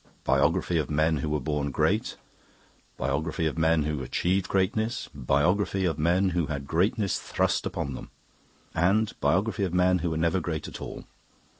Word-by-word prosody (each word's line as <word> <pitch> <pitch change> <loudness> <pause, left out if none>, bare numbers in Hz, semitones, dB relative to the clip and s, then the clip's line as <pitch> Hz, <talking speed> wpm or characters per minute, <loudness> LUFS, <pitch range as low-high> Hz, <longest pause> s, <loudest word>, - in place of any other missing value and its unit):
'Biography 75 +5 +2
of 75 - -2
Men 80 +1 +2
who 75 +2 -2
were 75 0 0
Born 70 +1 -2
Great', - - 0 0.8
'Biography 75 +5 -1
of 80 - -1
Men 80 -1 +2
who 75 -2 -2
Achieved 90 +7 0
Greatness', 110 +5 0
'Biography 90 +9 +1
of 80 -4 -1
Men 90 +5 +3
who 85 -3 0
had 70 -2 -4
Greatness 95 - +1
Thrust - - 0
upon 70 - -3
Them', - - -8 0.6
and 100 +6 +2
'Biography 100 +3 +1
of 90 -2 -1
Men 90 0 +3
who 85 +1 -1
were 80 - -2
Never 85 +3 +1
Great 80 -4 -4
at - - -9
All'. - - -7
80 Hz, 165 wpm, -27 LUFS, 75-95 Hz, 0.8 s, Men